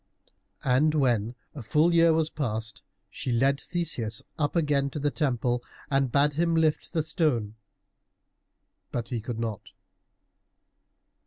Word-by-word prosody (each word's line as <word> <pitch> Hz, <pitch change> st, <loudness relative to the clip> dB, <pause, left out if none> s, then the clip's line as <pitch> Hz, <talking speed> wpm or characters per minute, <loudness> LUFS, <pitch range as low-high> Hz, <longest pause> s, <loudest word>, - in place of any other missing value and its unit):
And 140 Hz, +4 st, +3 dB
when 120 Hz, -5 st, +1 dB, 0.2 s
a 145 Hz, -, -7 dB
full 155 Hz, +9 st, +3 dB
year 165 Hz, 0 st, +6 dB
was 160 Hz, 0 st, +1 dB
past, 110 Hz, -6 st, -3 dB, 0.3 s
she 125 Hz, -, -4 dB
led 135 Hz, +4 st, +2 dB
Theseus 120 Hz, -11 st, -2 dB, 0.2 s
up 145 Hz, +1 st, 0 dB
again 145 Hz, -4 st, +2 dB
to 145 Hz, -, -7 dB
the 145 Hz, 0 st, 0 dB
temple 125 Hz, -5 st, 0 dB, 0.3 s
and 135 Hz, -2 st, +2 dB
bade 145 Hz, +2 st, +3 dB
him 165 Hz, +2 st, +1 dB
lift 160 Hz, -2 st, +1 dB
the 160 Hz, -3 st, +1 dB
stone, 150 Hz, -, 0 dB, 1.4 s
but 120 Hz, -1 st, -3 dB
he 120 Hz, -3 st, -2 dB
could 115 Hz, +1 st, -5 dB
not. 110 Hz, -4 st, -3 dB
140 Hz, 135 wpm, -27 LUFS, 120-155 Hz, 1.4 s, year